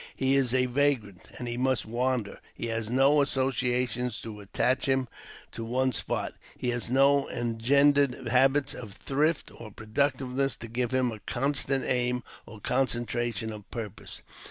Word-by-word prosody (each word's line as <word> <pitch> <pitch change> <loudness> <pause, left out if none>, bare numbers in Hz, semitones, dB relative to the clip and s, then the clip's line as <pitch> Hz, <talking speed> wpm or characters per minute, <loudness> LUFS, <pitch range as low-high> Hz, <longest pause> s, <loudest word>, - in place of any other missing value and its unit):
He 135 0 +1
is 135 -3 +2
a 130 0 +3
vagrant, 125 -8 0
and 125 - -5
he 120 0 -2
must 130 0 +1
wander; 120 -1 -1 0.2
he - - -4
has 115 -1 -2
no 135 +4 +4
associations 125 -3 0
to 110 -2 -8
attach 125 +7 0
him 130 -1 +1 0.4
to 115 - -6
one 130 +3 +1
spot; 115 - -2 0.2
he 125 - -2
has 120 -1 -2
no 140 +2 +4
engendered 130 +3 +2
habits 135 +3 +3
of 105 -5 -8
thrift 150 +8 0
or 115 - -9
productiveness 130 +4 -1
to 115 - -8
give 120 +1 -1
him 130 -1 +1
a 110 - -8
constant 135 +3 -1
aim 125 -1 0 0.2
or 110 - -11
concentration 120 -1 -1
of 105 -2 -11
purpose. 110 -4 -7
125 Hz, 155 wpm, -28 LUFS, 115-135 Hz, 0.4 s, no